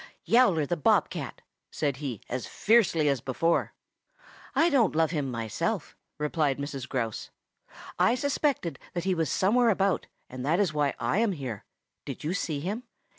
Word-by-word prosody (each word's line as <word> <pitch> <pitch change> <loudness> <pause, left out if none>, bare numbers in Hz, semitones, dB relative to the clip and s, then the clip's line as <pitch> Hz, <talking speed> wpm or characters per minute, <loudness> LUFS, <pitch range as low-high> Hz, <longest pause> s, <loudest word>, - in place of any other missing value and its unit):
"Yowler 210 -11 +4
the 175 - -1
Bob 150 - +3
cat," - - -6 0.3
said 140 -4 -1
he 130 -7 -5
as 125 0 -4
fiercely 195 -9 +3
as 140 -4 +1
before. 165 +7 0 0.8
"I 335 +1 +4
don't 235 - +3
love 160 0 +3
him 145 -5 -1
myself," 115 -3 -3 0.2
replied 150 -2 0
Mrs. 140 -2 -5
Grouse. 115 -5 -3 0.7
"I 235 - +4
suspected 275 - -1
that 175 - -2
he 190 0 +1
was 165 -4 0
somewhere 230 +5 +3
about, 195 -2 +1 0.2
and 130 0 -7
that 160 +7 +2
is 190 -7 +2
why 145 -2 +1
I 200 - +1
am 225 -3 +2
here. 130 - -6 0.4
Did - - -6
you 160 +4 -1
see 155 -7 -2
him?" 205 +9 -3
160 Hz, 165 wpm, -28 LUFS, 140-200 Hz, 0.8 s, Yowler